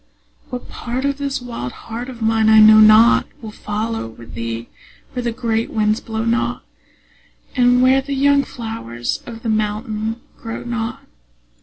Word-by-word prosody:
What 250 -1 -6
part 250 +3 -4
of 280 0 -1
this 280 -2 -3
wild 230 - -6
heart 235 +3 -7
of 240 -3 -7
mine 220 0 +3
I 220 0 +7
know 215 0 +8
not 215 +2 +6
Will 220 -2 -8
follow 215 - -3
with 115 +1 -13
thee 115 0 -5 0.5
where 250 - -2
the 235 -1 -1
great 230 -1 -1
winds 215 0 +1
blow 220 -1 -4
not, 235 +2 0 0.9
And 250 -1 +4
where 260 +1 +5
the 275 +1 -4
young 280 +1 +3
flowers 220 - -5
of 230 -1 -9
the 230 - -2
mountain 215 +1 -2 0.2
grow 225 -1 -6
not. 235 -1 -4
225 Hz, 160 wpm, -19 LUFS, 215-245 Hz, 0.9 s, know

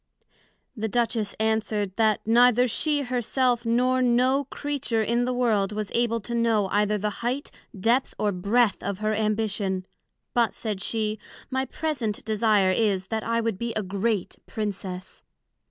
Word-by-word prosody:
The 220 -2 -2
Duchess 225 -2 0
answered, 215 -3 0
That 220 -1 +2
neither 245 +2 +5
she 290 +4 0
her 250 -1 -1
self, 245 0 +1
nor 250 +2 +2
no 255 +3 +3
Creature 275 -5 -2
in 235 +2 +1
the 250 - 0
World 220 -5 +1
was 210 -2 -4
able 230 -1 +1
to 235 +4 -6
know 230 -4 +2
either 210 +1 +2
the 210 +1 -1
height, 250 +4 -2 0.3
depth, 235 +7 +1
or 210 -1 +1
breadth 200 +4 +2
of 200 0 -3
her 215 +1 0
Ambition; 210 -3 -1 0.5
but 235 -2 +2
said 210 -4 -3
she, 215 0 -1 0.3
my 265 0 0
present 265 -7 -3
desire 215 -3 +3
is, 195 -2 +1
that 220 -1 -2
I 230 0 0
would 225 -4 -2
be 235 -1 -2
a 215 - 0
great 200 +1 -1
Princess. 190 -3 -5
220 Hz, 155 wpm, -25 LUFS, 210-240 Hz, 0.5 s, neither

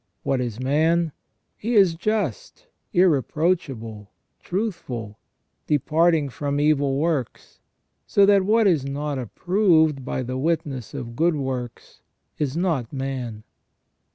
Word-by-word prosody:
What 135 -2 0
is 120 -2 -4
man? 160 +5 +2 0.4
He 230 +3 -2
is 195 -5 +6
just, 220 - -3 0.3
irreproachable, 140 - 0 0.3
truthful, 135 - -4 0.5
departing 155 +1 +2
from 145 +2 -2
evil 145 -2 +2
works, 150 -5 -2 0.5
so 200 - +5
that 200 -1 +5
what 220 +3 +3
is 165 -8 +3
not 140 0 -3
approved 160 - +2
by 130 - -3
the 130 +1 -4
witness 145 -5 -2
of 120 -4 -6
good 165 +4 +2
works 130 -4 -5 0.4
is 145 0 -1
not 160 -10 -1
man. 130 -5 -4
150 Hz, 115 wpm, -23 LUFS, 130-175 Hz, 0.5 s, is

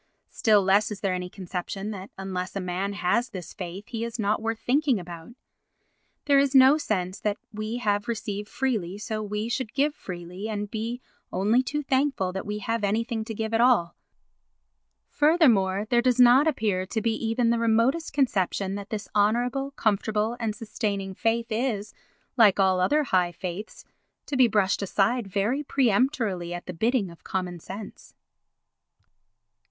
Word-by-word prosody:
Still 210 -3 +3
less 195 +3 +3
is 210 -2 -7
there 195 -2 0
any 180 0 -3
conception 190 +2 -5
that 195 -1 -7
unless 190 -1 -4
a - - -1
man 185 +2 -2
has 220 +6 0
this 180 -4 -8
faith 185 +2 -7
he 230 -1 -3
is 235 +1 -4
not 210 -1 0
worth 225 0 -2
thinking 265 -1 +1
about. 175 +4 -10 0.9
There 280 -1 +5
is 275 0 +1
no 265 +3 +7
sense 185 -8 -2
that 210 -1 -1
as - - -56
we 215 +2 -3
have 205 -4 0
received 210 -3 -4
freely 210 -9 -2
so 215 +1 -4
we 210 +1 -3
should 240 -1 -3
give 290 +2 +2
freely 180 - -7
and 205 -1 -4
be 230 +3 -4 0.3
only 210 +7 +2
too 295 +4 -3
thankful 265 -8 +1
that 190 +2 -5
we 210 0 -2
have 225 +1 -2
anything 220 +2 0
to 225 - -6
give 220 +1 -3
at 225 - +3
all. 235 -9 +3 1.1
Furthermore 230 - +3
there 240 -1 +4
does 250 0 +2
not 250 +5 +7
appear 205 -10 0
to 220 - -2
be 225 +1 0
even 230 +1 +1
the 235 - +1
remotest 230 +8 +2
conception 195 -8 0
that 200 0 -6
this 215 -2 -4
honourable, 240 +6 +1
comfortable 220 -2 0
and 220 -3 -2
sustaining 200 -3 -3
faith 230 +3 -1
is, 215 -3 -2 0.4
like 210 -5 +5
all 190 -1 +3
other 295 +12 +3
high 180 -8 +1
faiths, 180 +4 -7 0.4
to 285 - -4
be 255 -2 +6
brushed 205 -3 +1
aside 200 +4 +1
very 205 +8 0
peremptorily 225 - +1
at 175 - -7
the 180 - -6
bidding 220 +1 0
of 170 - -16
common 180 -2 -3
sense. 200 +5 -10
215 Hz, 170 wpm, -26 LUFS, 195-240 Hz, 1.1 s, no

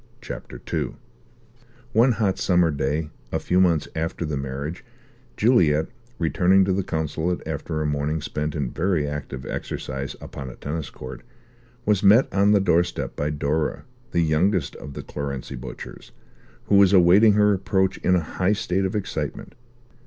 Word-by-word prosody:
CHAPTER - - -8
II - - -1 1.0
One 120 +3 +5
hot 105 -4 0
summer 90 -3 +3
day, 75 +2 -2 0.2
a - - +1
few 90 +1 +2
months 85 -4 +2
after 80 +2 -2
the 75 -1 -2
marriage, 70 +4 -5 0.5
Juliet, 85 -10 +3 0.3
returning 90 +4 +3
to 95 - +1
the 100 - +1
consulate 80 +1 -2
after 75 -1 -3
a - - -2
morning 75 +1 -1
spent 75 0 -3
in 70 -5 -2
very 85 -3 0
active 70 -2 -5
exercise 65 +1 -5
upon 70 -2 -8
a - - -10
tennis 75 -2 -4
court, 65 -1 -9 0.6
was 105 -2 +2
met 105 +6 +5
on 100 +1 +4
the 105 - +5
doorstep 90 -2 +1
by 75 - -1
Dora, 75 +1 -1 0.3
the 85 - +1
youngest 85 +4 +1
of 70 - -9
the - - -6
Clarency 70 -2 -5
Butchers, - - -9 0.5
who 100 - +3
was 100 -1 +6
awaiting 95 +4 +6
her 105 0 +4
approach 95 -1 0
in 90 - +3
a 90 - +2
high 90 +5 0
state 95 -3 0
of 95 - -2
excitement. 105 - -4
85 Hz, 160 wpm, -24 LUFS, 75-95 Hz, 1.0 s, was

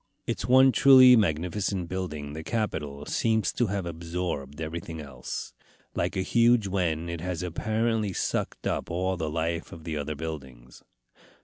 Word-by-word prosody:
Its - - -3
one 130 +1 +7
truly 130 -2 +8
magnificent 90 0 0
building, 75 -6 -4
the 80 - -5
Capitol, 75 -10 -3
seems 110 +2 +1
to 120 - +1
have 100 -2 -2
absorbed 85 -4 -4
everything 80 0 -5
else. 65 -5 -6 0.4
Like - - -1
a 95 - +1
huge 115 +2 +4
wen, 85 -4 -1
it 85 -1 -5
has 90 -1 -3
apparently 110 +4 -1
sucked - - -2
up - - -2
all 95 +2 -1
the 80 -3 -3
life 80 +1 -2
of 80 - -10
the 80 -2 -3
other 75 +1 -3
buildings. 70 -6 -8
85 Hz, 150 wpm, -27 LUFS, 80-105 Hz, 0.4 s, truly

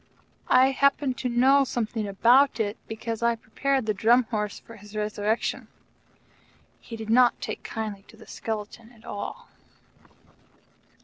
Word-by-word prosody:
I 260 +1 +5
happen 280 0 +2
to 250 0 -3
know 265 +4 +4
something 225 -4 -3
about 240 +7 +4
it, 210 -1 -1
because 225 0 -5
I 235 0 +2
prepared 265 +3 -1
the 215 - 0
Drum 235 +5 +4
Horse 210 -2 -2
for 230 - -14
his 210 +1 -14
resurrection. 210 +1 -2 1.1
He 230 - -9
did 220 -1 -5
not 245 +1 +4
take - - -5
kindly 215 -3 -5
to 225 - -17
the 220 - -14
skeleton 220 +1 -6
at 225 -1 -20
all. 205 - -6
225 Hz, 140 wpm, -26 LUFS, 215-250 Hz, 1.1 s, I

